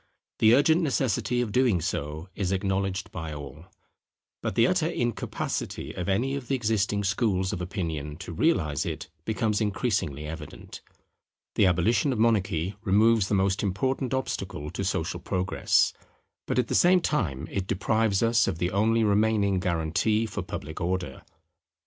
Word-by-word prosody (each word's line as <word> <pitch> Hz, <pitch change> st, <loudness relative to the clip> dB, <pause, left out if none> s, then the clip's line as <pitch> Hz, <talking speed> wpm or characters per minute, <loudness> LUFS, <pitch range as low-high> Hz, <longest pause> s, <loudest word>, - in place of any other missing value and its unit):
The 110 Hz, +2 st, +6 dB
urgent 160 Hz, +5 st, +4 dB
necessity 125 Hz, -, 0 dB
of 115 Hz, -4 st, -2 dB
doing 120 Hz, -6 st, +3 dB
so 80 Hz, -1 st, -3 dB
is 95 Hz, -3 st, -2 dB
acknowledged 95 Hz, 0 st, -1 dB
by 80 Hz, -2 st, -5 dB
all; 75 Hz, +4 st, -9 dB, 0.7 s
but -, -, -3 dB
the -, -, +5 dB
utter -, -, +2 dB
incapacity 120 Hz, -1 st, -3 dB
of 90 Hz, +1 st, -4 dB
any 120 Hz, +8 st, +1 dB
of 140 Hz, -3 st, -4 dB
the 135 Hz, -, +1 dB
existing 105 Hz, -4 st, 0 dB
schools 100 Hz, -2 st, 0 dB
of 90 Hz, -, -4 dB
opinion 80 Hz, -5 st, -4 dB
to 90 Hz, -1 st, -7 dB
realize 80 Hz, -, +1 dB
it -, -, -5 dB
becomes 110 Hz, -1 st, 0 dB
increasingly 100 Hz, -, -1 dB
evident. 75 Hz, -1 st, -8 dB, 0.7 s
The 100 Hz, -, +4 dB
abolition 105 Hz, -, +2 dB
of 125 Hz, -, -1 dB
monarchy 100 Hz, -5 st, +1 dB
removes 110 Hz, +1 st, +4 dB
the 105 Hz, -, +1 dB
most 95 Hz, +1 st, +1 dB
important 125 Hz, +7 st, -1 dB
obstacle 95 Hz, -, -3 dB
to 95 Hz, -, -4 dB
social 85 Hz, -2 st, -2 dB
Progress: 95 Hz, 0 st, +1 dB, 0.5 s
but -, -, -1 dB
at -, -, +2 dB
the -, -, -3 dB
same 180 Hz, +1 st, +5 dB
time 80 Hz, -, -1 dB
it 95 Hz, -1 st, -2 dB
deprives 105 Hz, +2 st, +1 dB
us 115 Hz, +1 st, +3 dB
of -, -, -1 dB
the 90 Hz, +2 st, -1 dB
only 110 Hz, +3 st, +2 dB
remaining 105 Hz, -2 st, +2 dB
guarantee 90 Hz, +5 st, +1 dB
for 105 Hz, -2 st, -4 dB
public 80 Hz, -3 st, -6 dB
Order. 90 Hz, -5 st, -2 dB
100 Hz, 155 wpm, -27 LUFS, 90-115 Hz, 0.7 s, The